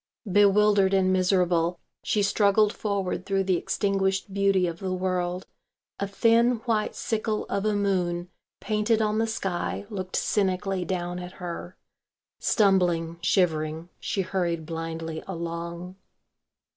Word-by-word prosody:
Bewildered 200 Hz, 0 st, +4 dB
and 185 Hz, -1 st, +3 dB
miserable, 180 Hz, -2 st, +2 dB, 0.2 s
she 210 Hz, -, +1 dB
struggled 205 Hz, +1 st, +3 dB
forward 195 Hz, -3 st, -2 dB
through 195 Hz, 0 st, 0 dB
the 190 Hz, -1 st, +2 dB
extinguished 195 Hz, +1 st, -1 dB
beauty 195 Hz, -2 st, +3 dB
of 170 Hz, 0 st, -4 dB
the 190 Hz, -2 st, -3 dB
world. 180 Hz, 0 st, -1 dB, 0.5 s
A 200 Hz, -, -1 dB
thin 230 Hz, +4 st, +3 dB
white 220 Hz, -3 st, 0 dB
sickle 215 Hz, -1 st, -2 dB
of 200 Hz, +1 st, -1 dB
a 215 Hz, -1 st, +2 dB
moon 180 Hz, -3 st, 0 dB, 0.3 s
painted 215 Hz, +2 st, +1 dB
on 215 Hz, 0 st, +1 dB
the 225 Hz, -, +1 dB
sky 195 Hz, -3 st, -3 dB
looked 185 Hz, -3 st, -4 dB
cynically 190 Hz, -2 st, 0 dB
down 175 Hz, 0 st, -3 dB
at 180 Hz, 0 st, -8 dB
her. 175 Hz, 0 st, -7 dB, 0.6 s
Stumbling, 175 Hz, -5 st, +2 dB
shivering, 160 Hz, -2 st, +1 dB
she 195 Hz, -, -1 dB
hurried 170 Hz, -3 st, -2 dB
blindly 165 Hz, 0 st, -5 dB
along. 170 Hz, +1 st, -5 dB
190 Hz, 125 wpm, -26 LUFS, 175-200 Hz, 0.6 s, Bewildered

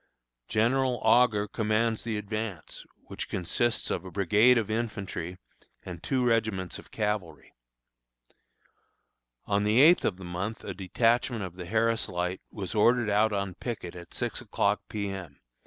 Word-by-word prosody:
General 125 Hz, +3 st, +2 dB
Augur 110 Hz, -2 st, +4 dB
commands 110 Hz, +1 st, 0 dB
the 115 Hz, -2 st, -3 dB
advance, 105 Hz, -4 st, -5 dB, 0.2 s
which -, -, -6 dB
consists 115 Hz, +7 st, 0 dB
of -, -, -2 dB
a 95 Hz, -, -8 dB
brigade 105 Hz, +7 st, +4 dB
of 110 Hz, -2 st, -1 dB
infantry 100 Hz, -6 st, -3 dB, 0.5 s
and 90 Hz, -3 st, -8 dB
two 130 Hz, +3 st, 0 dB
regiments 110 Hz, -6 st, 0 dB
of -, -, -15 dB
cavalry. 105 Hz, -8 st, -3 dB, 1.9 s
On 100 Hz, 0 st, +1 dB
the 105 Hz, +3 st, +3 dB
eighth 165 Hz, +6 st, +7 dB
of 90 Hz, -, 0 dB
the 95 Hz, -, -10 dB
month 95 Hz, +6 st, -4 dB
a -, -, -5 dB
detachment 115 Hz, +4 st, +1 dB
of 90 Hz, -2 st, -7 dB
the 90 Hz, -2 st, -7 dB
Harris 115 Hz, +2 st, +1 dB
Light 90 Hz, +1 st, -2 dB
was 95 Hz, -3 st, -5 dB
ordered 115 Hz, 0 st, +3 dB
out 105 Hz, +2 st, +3 dB
on 100 Hz, -2 st, -2 dB
picket 95 Hz, -5 st, -6 dB
at 85 Hz, -1 st, -11 dB
six -, -, -3 dB
o'clock -, -, 0 dB
P. 100 Hz, -1 st, -3 dB
M. 90 Hz, -7 st, -8 dB
105 Hz, 150 wpm, -28 LUFS, 95-115 Hz, 1.9 s, eighth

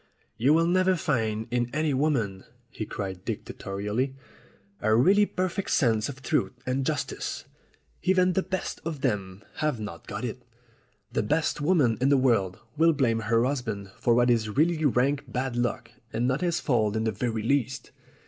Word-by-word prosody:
"You 135 Hz, +7 st, +4 dB
will 165 Hz, +1 st, +4 dB
never 185 Hz, +2 st, +3 dB
find 110 Hz, -9 st, -1 dB
in 120 Hz, -1 st, 0 dB
any 155 Hz, -1 st, +1 dB
woman," 125 Hz, -9 st, 0 dB, 0.3 s
he 110 Hz, -, -5 dB
cried 95 Hz, -3 st, -5 dB
dictatorhlly, 105 Hz, +7 st, -3 dB, 0.6 s
"a 110 Hz, +1 st, +2 dB
really 200 Hz, -, +5 dB
perfect 185 Hz, +1 st, -2 dB
sense 115 Hz, -5 st, +2 dB
of 135 Hz, -1 st, -9 dB
truth -, -, 0 dB
and 130 Hz, +1 st, 0 dB
jus -, -, 0 dB
tice. -, -, -5 dB, 0.6 s
Even 185 Hz, 0 st, +3 dB
the 190 Hz, -, +2 dB
best 185 Hz, 0 st, -4 dB
of 160 Hz, -4 st, -4 dB
them 100 Hz, -6 st, -2 dB
have 150 Hz, -6 st, 0 dB
not 105 Hz, -6 st, -7 dB
got -, -, -4 dB
it. -, -, -5 dB, 0.7 s
The -, -, +1 dB
best 150 Hz, 0 st, 0 dB
woman 145 Hz, -9 st, +3 dB
in 135 Hz, -, +4 dB
the 140 Hz, -, +5 dB
world 110 Hz, -8 st, +2 dB, 0.2 s
will 165 Hz, +1 st, +5 dB
blame 120 Hz, -6 st, +1 dB
her 115 Hz, +2 st, +2 dB
husband 110 Hz, -8 st, -3 dB
for 120 Hz, -, +3 dB
what 120 Hz, 0 st, +4 dB
is 110 Hz, -2 st, +1 dB
really 160 Hz, +7 st, +2 dB
rank 135 Hz, +1 st, +1 dB
bad 130 Hz, 0 st, -2 dB
luck 120 Hz, -1 st, -2 dB, 0.2 s
and 120 Hz, +2 st, 0 dB
not 130 Hz, +4 st, 0 dB
his 175 Hz, -1 st, +1 dB
fault 110 Hz, -6 st, +1 dB
in 110 Hz, -, 0 dB
the 110 Hz, -, +1 dB
very 110 Hz, +1 st, -2 dB
least. 135 Hz, +1 st, -1 dB
125 Hz, 175 wpm, -27 LUFS, 110-155 Hz, 0.7 s, really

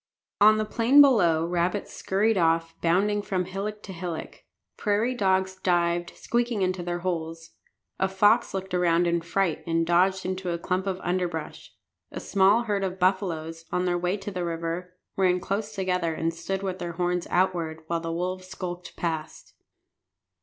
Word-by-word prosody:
On 215 Hz, +1 st, +7 dB
the 215 Hz, -, 0 dB
plain 235 Hz, +6 st, +4 dB
below 180 Hz, -, +5 dB
rabbits 175 Hz, +3 st, -1 dB
scurried 210 Hz, +4 st, +1 dB
off, 165 Hz, -2 st, +2 dB
bounding 200 Hz, +5 st, +2 dB
from 185 Hz, -3 st, -2 dB
hillock 205 Hz, +3 st, -5 dB
to 195 Hz, -, -8 dB
hillock. 170 Hz, -2 st, -6 dB, 0.3 s
Prairie 215 Hz, +4 st, 0 dB
dogs 190 Hz, -4 st, +1 dB
dived, 175 Hz, -1 st, 0 dB
squeaking, 235 Hz, -4 st, 0 dB
into 185 Hz, 0 st, -1 dB
their 175 Hz, 0 st, -3 dB
holes. 165 Hz, -2 st, -4 dB, 0.5 s
A 190 Hz, -, +2 dB
fox 205 Hz, +4 st, +3 dB
looked 190 Hz, -1 st, -5 dB
around 175 Hz, -1 st, +3 dB
in 170 Hz, 0 st, +1 dB
fright, 170 Hz, 0 st, -1 dB
and 165 Hz, 0 st, +1 dB
dodged 185 Hz, +3 st, +2 dB
into 185 Hz, 0 st, -3 dB
a 170 Hz, -, -1 dB
clump 185 Hz, +3 st, -2 dB
of 190 Hz, -1 st, -2 dB
underbrush. 175 Hz, -3 st, -3 dB, 0.4 s
A -, -, -5 dB
small 200 Hz, +4 st, +3 dB
herd 205 Hz, -3 st, -1 dB
of 190 Hz, -1 st, -2 dB
buffaloes, 165 Hz, -4 st, -1 dB
on 180 Hz, 0 st, 0 dB
their 175 Hz, -1 st, +1 dB
way 180 Hz, +3 st, 0 dB
to 200 Hz, +1 st, -6 dB
the 180 Hz, -2 st, -3 dB
river, 170 Hz, +2 st, -4 dB, 0.2 s
ran 180 Hz, -2 st, +3 dB
close 210 Hz, +3 st, -3 dB
together 180 Hz, -4 st, -1 dB
and 165 Hz, +1 st, -1 dB
stood 190 Hz, +4 st, -4 dB
with 190 Hz, -1 st, -3 dB
their 170 Hz, 0 st, -4 dB
horns 175 Hz, +1 st, -1 dB
outward, 170 Hz, -3 st, 0 dB
while 170 Hz, +1 st, -1 dB
the 165 Hz, 0 st, -4 dB
wolves 185 Hz, +2 st, -3 dB
skulked 180 Hz, -1 st, -7 dB
past. 160 Hz, -2 st, -4 dB
180 Hz, 165 wpm, -26 LUFS, 170-195 Hz, 0.5 s, On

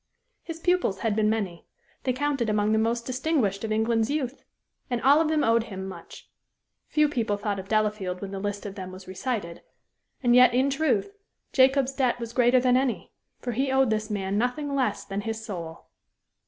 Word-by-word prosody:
His 330 Hz, -1 st, -7 dB
pupils 350 Hz, -, +1 dB
had 220 Hz, -3 st, 0 dB
been 215 Hz, -1 st, +2 dB
many; 200 Hz, -6 st, -3 dB, 0.4 s
they 260 Hz, -, +2 dB
counted 270 Hz, -3 st, -1 dB
among 210 Hz, 0 st, +1 dB
the 220 Hz, -, +3 dB
most 235 Hz, +1 st, 0 dB
distinguished 255 Hz, -7 st, 0 dB
of 220 Hz, -, -3 dB
England's 225 Hz, +1 st, +1 dB
youth; 280 Hz, -3 st, -2 dB, 0.5 s
and 245 Hz, -2 st, -1 dB
all 285 Hz, +4 st, +6 dB
of 325 Hz, -, +1 dB
them 310 Hz, -1 st, +1 dB
owed 230 Hz, 0 st, +3 dB
him 190 Hz, -3 st, -6 dB
much. 190 Hz, -, -11 dB, 0.6 s
Few 300 Hz, 0 st, +3 dB
people 230 Hz, -7 st, -1 dB
thought 205 Hz, -1 st, -2 dB
of 190 Hz, -, -8 dB
Delafield 210 Hz, -4 st, 0 dB
when 195 Hz, 0 st, -6 dB
the 195 Hz, -, -4 dB
list 205 Hz, +1 st, -4 dB
of 200 Hz, -, -5 dB
them 185 Hz, -2 st, -7 dB
was 185 Hz, 0 st, -11 dB
recited; 190 Hz, -3 st, -4 dB, 0.6 s
and 240 Hz, -1 st, +4 dB
yet, 250 Hz, -1 st, +7 dB
in 265 Hz, +2 st, +3 dB
truth, 280 Hz, -, 0 dB, 0.4 s
Jacob's 265 Hz, 0 st, +4 dB
debt 260 Hz, -3 st, +1 dB
was 235 Hz, -1 st, -6 dB
greater 245 Hz, +1 st, +4 dB
than 250 Hz, 0 st, +3 dB
any; 260 Hz, -2 st, -1 dB, 0.3 s
for 245 Hz, -, -3 dB
he 265 Hz, +3 st, 0 dB
owed 265 Hz, -3 st, +3 dB
this 215 Hz, 0 st, -1 dB
man 200 Hz, -1 st, -1 dB
nothing 280 Hz, +4 st, -1 dB
less 270 Hz, -2 st, 0 dB
than 195 Hz, 0 st, -3 dB
his 225 Hz, +1 st, -5 dB
soul. 170 Hz, -6 st, -7 dB
230 Hz, 195 wpm, -26 LUFS, 205-265 Hz, 0.6 s, yet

